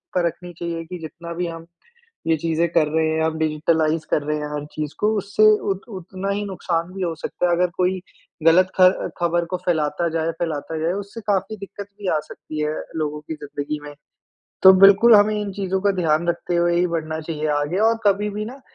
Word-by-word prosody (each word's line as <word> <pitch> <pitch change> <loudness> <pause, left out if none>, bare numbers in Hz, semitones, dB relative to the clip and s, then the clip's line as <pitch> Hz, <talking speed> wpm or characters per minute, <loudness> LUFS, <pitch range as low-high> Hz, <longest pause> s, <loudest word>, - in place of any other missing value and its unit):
परखनी 175 0 -1
चाहिए 170 -1 -3
कि 180 +1 -7
जितना 170 +2 -8
भी 175 +1 -2
हम 165 0 -7 0.6
ये 160 - +4
चीज़ें 165 +2 0
कर 160 -3 +3
रहे 160 +1 +1
हैं 160 0 0
हम 160 0 0
डिज़िटलाइज़ 155 0 +1
कर 150 - +2
रहे 150 +1 -1
हैं 150 - -4
हर 145 0 -3
चीज़ 150 -1 -4
को 215 +1 +3
उससे 200 +2 -1 0.3
उत 195 - -6 0.2
उतना 185 +2 -6
ही 205 +1 -1
नुकसान 175 -2 -2
भी 190 -1 -5
हो 170 -2 -1
सकता 180 - -1
है 175 - +2
अगर 180 0 +2
कोई 185 +1 +1 0.4
गलत 185 +3 +5
ख़र 185 0 +4
ख़बर 170 0 +1
को 185 - 0
फ़ैलाता 160 0 +1
जाए 165 0 -1
फ़ैलाता 160 -1 -3
जाए, 165 +2 +1
उससे 200 +3 -6
काफ़ी 200 +2 0
दिक्कत 200 0 -9
भी 200 -3 -4
आ - - +2
सकती 155 0 -8
है 150 +1 -1 0.2
लोगों 150 -1 -2
की 160 - -6
ज़िंदगी 145 0 -5
में। 145 - -9 0.7
तो 190 - +10
बिल्कुल 205 +4 +8
हमें 210 +1 +4
इन 200 -1 -4
चीज़ों 190 -1 -2
का 200 - +3
ध्यान 160 0 +2
रखते 170 0 -1
हुए 170 0 +2
ही 180 +1 +3
बढ़ना 160 -1 -3
चाहिए 155 -1 -4
आगे 145 +6 -1
और 230 - +3
कभी 205 +1 +3
भी 210 +1 -4
ना 255 +5 -9
170 Hz, 210 wpm, -22 LUFS, 160-190 Hz, 0.7 s, तो